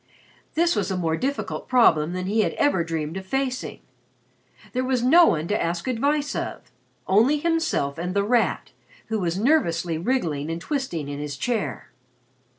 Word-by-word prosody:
This 340 +1 +3
was - - -1
a 190 - -1
more 165 -3 0
difficult 275 +9 -3
problem 175 -11 +4
than 185 0 -3
he 210 +4 0
had - - 0
ever 285 -12 +2
dreamed 165 0 -3
of 190 - -7
facing. 265 +2 -2 0.9
There 255 0 0
was 255 -2 0
no 330 +7 +7
one 155 +1 0
to 210 - 0
ask 170 +3 -2
advice 285 +4 0
of. 125 - -5 0.3
Only 230 +10 +4
himself 320 - 0
and 180 +2 -3
The 200 - +2
Rat, 235 +2 +1 0.4
who 220 -1 0
was 175 -1 -1
nervously 175 - +1
wriggling 165 - -1
and 165 +1 -3
twisting 175 - -3
in 145 0 -5
his 145 -1 -5
chair. 230 - -3
200 Hz, 165 wpm, -24 LUFS, 165-265 Hz, 0.9 s, no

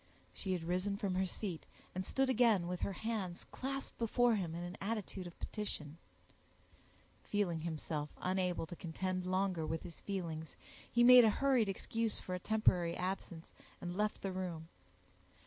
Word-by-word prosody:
She 190 -2 -2
had 175 -3 -2
risen 185 +4 0
from 200 -2 -1
her 190 +1 +1
seat, 180 -3 -4 0.3
and 185 - -2
stood 270 +7 +1
again 230 -8 +4
with 180 0 -2
her 200 - -1
hands 200 -4 -3
clasped 275 +1 -4
before 235 +1 +3
him 175 -6 -1
in 170 - -4
an 175 +1 -5
attitude 200 -3 -3
of 175 - -11
petition; 165 -7 -4 1.2
feeling 185 -6 0
himself 155 -2 -3
unable 180 -2 0
to 170 - -8
contend 185 +2 -2
longer 185 -2 +1
with 160 +1 -2
his 170 -2 -9
feelings, 165 -5 -4 0.4
he 240 - +5
made 250 0 +11
a 225 - +7
hurried 255 -2 +3
excuse 225 +3 -1
for 185 - -5
a 180 - -1
temporary 180 -5 +2
absence, 180 -3 -4 0.3
and 175 0 -4
left 210 +1 0
the 195 - -1
room. 175 -3 -4
185 Hz, 165 wpm, -36 LUFS, 175-210 Hz, 1.2 s, made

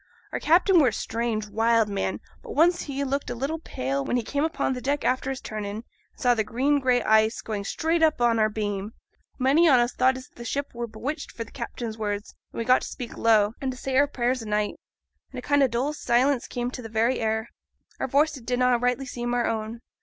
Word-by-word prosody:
Our - - -2
captain 355 +3 +4
were 285 - +5
a 230 - +1
strange, 225 -1 -2
wild 225 +1 +2
man, 200 -1 -2 0.2
but 460 - -8
once 345 +3 +4
he 280 -1 -3
looked 275 +1 -2
a 245 - -3
little 280 +7 -2
pale 135 - -3
when 245 - 0
he 240 - -1
came 285 +6 -1
upo' 320 -3 0
deck 280 +3 -1
after 255 +1 +1
his 265 -1 -4
turn 215 -1 -5
in, 200 0 -4
and 220 - -6 0.3
saw 245 -1 +3
the 220 -2 0
green 270 +7 +1
gray 250 -2 +2
ice 220 +1 +3
going 210 -2 -3
straight 325 +8 0
up 315 -4 +3
on 235 -1 +3
our 215 0 +3
beam. 205 -1 -3 0.4
Many 285 +6 +4
on 260 -3 +6
us 240 +1 +1
thought 260 +1 +3
as 260 - -11
the 240 - -11
ship 280 +4 -3
were 235 0 -4
bewitched 240 +8 -5
for 230 - -5
th' 225 - -17
captain's 235 -3 -5
words; 205 -1 -3 0.2
and - - -11
we 230 - -2
got 255 +2 +5
to - - -5
speak 245 -2 -7
low, 215 -2 +3
and 270 - -1
to 255 - -9
say 265 0 -3
our 285 +2 +5
prayers 250 -2 -1
o' 225 - -8
nights, 210 0 0 0.5
and - - -9
a - - -4
kind 285 -1 +3
o' 270 - +5
dull 255 +5 -1
silence 255 -1 +1
came 245 0 -3
into 250 - -7
th' 225 - -8
very 230 +4 +1
air; 220 0 -1 0.5
our - - -1
voices 285 +1 +2
did 245 +2 -2
na' 250 -1 +3
rightly 250 +2 0
seem 240 -1 -3
our 240 - +1
own. 225 +1 -3
245 Hz, 240 wpm, -25 LUFS, 220-275 Hz, 0.5 s, on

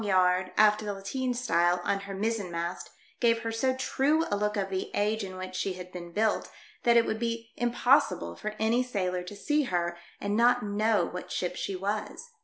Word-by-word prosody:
yard, 185 -2 +3
after 210 0 +5
the 205 -1 -3
lateen 250 +7 -2
style, 175 -8 +2
on 200 - +1
her 195 0 -7
mizzen 210 -1 -1
mast, 170 +1 -4 0.3
gave 230 -1 +3
her 225 - -2
so 260 +3 +1
true 280 +5 +1
a - - +3
look 210 +1 -1
of 195 -1 -1
the 190 0 -2
age 210 +1 +1
in 185 -1 -6
which 185 0 -6
she 185 +1 -1
had 180 0 -9
been 175 -1 -8
built 215 +4 +1 0.3
that 235 -1 +5
it 230 - +5
would 220 - -2
be 230 -1 -3
impossible 240 - +2
for 215 - -5
any 225 +3 +2
sailor 185 -7 -1
to 180 +3 -8
see 295 +8 +1
her 175 -4 -1 0.2
and 205 0 -1
not 245 +2 +4
know 210 -2 +2
what 180 +1 -7
ship 180 -1 -2
she 195 - -3
was. 210 - -4
205 Hz, 205 wpm, -29 LUFS, 185-230 Hz, 0.3 s, after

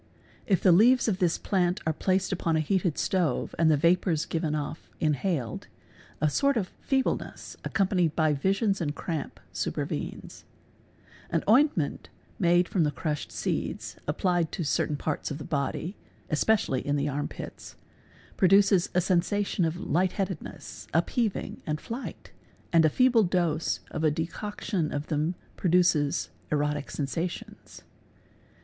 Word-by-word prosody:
If 190 -4 +2
the 185 - +7
leaves 235 +9 +5
of 195 -4 0
this 175 -2 +2
plant 180 0 0
are 160 - +1
placed 185 +4 0
upon 170 -3 0
a - - +3
heated 175 0 0
stove 180 -4 0
and 165 -1 +5
the 155 - +4
vapours 170 0 +2
given 160 -2 -1
off 150 +1 -5
inhaled, 150 - -1 0.5
1 155 - +2
sort 280 - +2
of 190 -5 -1
feebleness, 265 -1 -1
accompanied 185 -6 +1
by 155 -2 +3
visions 195 - +1
and 150 -2 -2
cramp, 160 -3 -4
supervenes, - - -4 0.9
Ar - - +1
ointment 225 - +3 0.3
made 175 -1 +4
from 180 - +1
the 150 - +2
crushed 150 +1 -3
seeds, - - -3
applied 175 +2 +1
to 180 - -2
certain 145 0 0
parts 150 +1 -2
of 145 - -4
the 150 - -7
body 150 +6 -2 0.4
(especially 155 -4 +2
in 145 - 0
the 145 0 0
arm 145 0 -2
pits), - - -9 0.6
produces 195 -1 +5
a 180 - +4
sensation 185 +1 +1
of 165 +1 -2
lightheaded. 185 0 0
ness, - - -10
upheaving, 210 +5 0
and 150 0 -1
flight, 235 - -7 0.4
and 165 -1 +6
a - - +5
feeble 250 - +4
dose 170 -4 0
of 155 - -3
a 155 - +5
decoction 165 +2 -3
of 145 +1 -4
them 155 +3 0 0.2
produces 175 -5 +2 0.2
erotic 150 -1 0
sensations. 165 +5 -5
170 Hz, 140 wpm, -28 LUFS, 150-190 Hz, 0.9 s, the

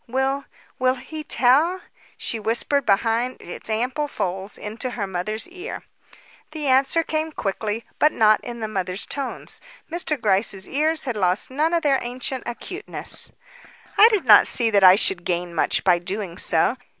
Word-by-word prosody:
"Will 265 +3 -1 0.3
will 255 0 +2
he 305 +5 -8
tell?" 295 +8 +2 0.4
she 230 - -3
whispered 235 +5 -1
behind 225 +5 +1
its 175 - -10
ample 250 +7 -1
folds 190 -5 -4
into 225 +4 -6
her 205 - -1
mother's 195 - -2
ear. 370 +5 -8 0.7
The 305 -2 -5
answer 270 +5 +3
came 315 0 -2
quickly, 215 -2 -3
but 305 - +4
not 215 -1 +3
in 235 -1 -7
the 220 - -2
mother's 190 -2 -3
tones. 275 -2 -6 0.3
Mr. 325 -4 -2
Gryce's 195 -2 0
ears 310 +3 0
had 250 -4 -3
lost 185 +3 +2
none 305 +5 0
of 340 -1 0
their 275 -3 +3
ancient 250 +1 -4
acuteness. 365 - -5 0.6
"I 435 +3 +8
do 425 -4 +1
not 220 -7 +7
see 230 -2 +4
that 200 -2 +3
I 185 0 +9
should 190 -3 +3
gain 175 0 -2
much 165 - +1
by 180 -2 +3
doing 185 0 -5
so. 170 +9 +2
240 Hz, 160 wpm, -22 LUFS, 200-285 Hz, 0.7 s, I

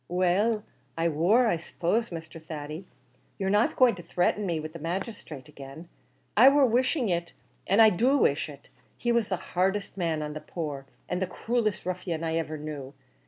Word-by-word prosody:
"Well 190 +5 +2 0.3
I 165 +1 +2
wor; 180 +11 +3
I 215 -7 +2
suppose, 180 +7 -1
Mr. 165 -1 -8
Thady, 155 +2 -6 0.5
you're 190 -1 -1
not 205 +2 +3
going 250 -2 +5
to 175 - -8
threaten 180 +4 0
me 170 -3 -1
with 155 0 -7
the 165 - -8
magisthrate 165 - -5
again. 140 +5 -11 0.5
I 250 +6 +9
wor 280 0 +5
wishing 250 +1 +1
it 170 -1 -1 0.3
an' 200 +3 +3
I 220 -1 +8
do 255 +10 +3
wish 145 - +2
it; 140 -1 -13 0.3
he 240 - 0
was 235 -3 +1
the 185 - 0 0.2
hardest 190 +3 0
man 165 -4 -1
on 150 0 -5
the 155 - -6
poor 150 -4 -5 0.2
an' 180 - -2
the 190 - -1
cruelest 225 +1 -1
ruffian 180 -3 -3
I 165 0 0
iver 155 -1 -4
knew. 145 -3 -7
175 Hz, 185 wpm, -28 LUFS, 155-210 Hz, 0.5 s, I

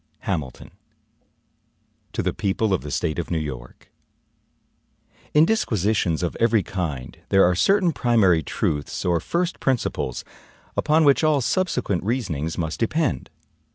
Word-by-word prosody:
HAMILTON 75 -10 -4 1.4
To - - -2
the - - 0
People 100 +1 0
of 95 - 0
the 75 - -7
State 80 +3 -1
of 85 - -4
New 85 - 0
York: 65 -6 -7 1.4
IN 150 +2 +7
DISQUISITIONS 105 - 0
of 85 - -2
every 115 -3 +3
kind, 80 -10 -5
there 95 - +5
are 90 - +3
certain 185 - +3
primary 110 - +3
truths, 75 0 -2
or 85 -2 +2
first 175 - -2
principles, 120 - -1 0.5
upon 155 +1 +3
which 140 +1 +4
all 155 -2 +3
subsequent 120 - 0
reasonings 90 - -2
must 80 -2 -3
depend. 150 +5 -1
95 Hz, 130 wpm, -23 LUFS, 80-130 Hz, 1.4 s, IN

